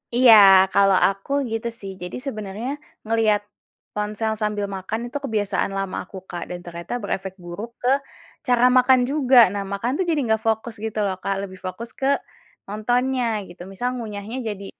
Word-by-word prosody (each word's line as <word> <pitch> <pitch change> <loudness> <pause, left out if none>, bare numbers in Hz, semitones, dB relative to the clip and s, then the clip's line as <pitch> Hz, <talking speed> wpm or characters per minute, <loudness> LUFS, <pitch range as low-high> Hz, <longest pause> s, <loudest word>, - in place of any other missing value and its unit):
Iya, 245 -2 +8 0.4
kalau 195 -1 +5
aku 195 +7 -5 0.2
gitu 225 +1 -2
sih. 195 -1 -7
Jadi 180 - -6
sebenarnya 215 +1 -5 0.4
ngelihat 220 -2 +2 0.6
ponsel 210 +1 -1
sambil 210 -1 -1
makan 190 +4 -4
itu 285 - -3
kebiasaan 205 -4 -1
lama 195 -1 -3
aku, 190 - -11
Kak, 175 - -5
dan 175 - -6
ternyata 170 +4 -7
berefek 190 -1 -3
buruk 205 +7 -7
ke 250 - +1 0.6
cara 245 -1 +3
makan 255 0 +5
juga. 270 -3 +3 0.2
Nah, 200 -1 -2
makan 230 +5 -1
tuh 375 - 0
jadi 310 -3 +2
nggak 220 -1 +1
fokus 220 +1 0
gitu 220 -1 -3
loh, 190 -1 -1
Kak, 195 - 0
lebih 190 - -11
fokus 230 +5 -5
ke 270 - 0 0.6
nontonnya 245 +4 0 0.3
gitu. 175 0 -13
Misal 240 +6 -3
ngunyahnya 215 +1 -6
jadi 200 -1 -6
215 Hz, 165 wpm, -23 LUFS, 195-240 Hz, 0.6 s, Iya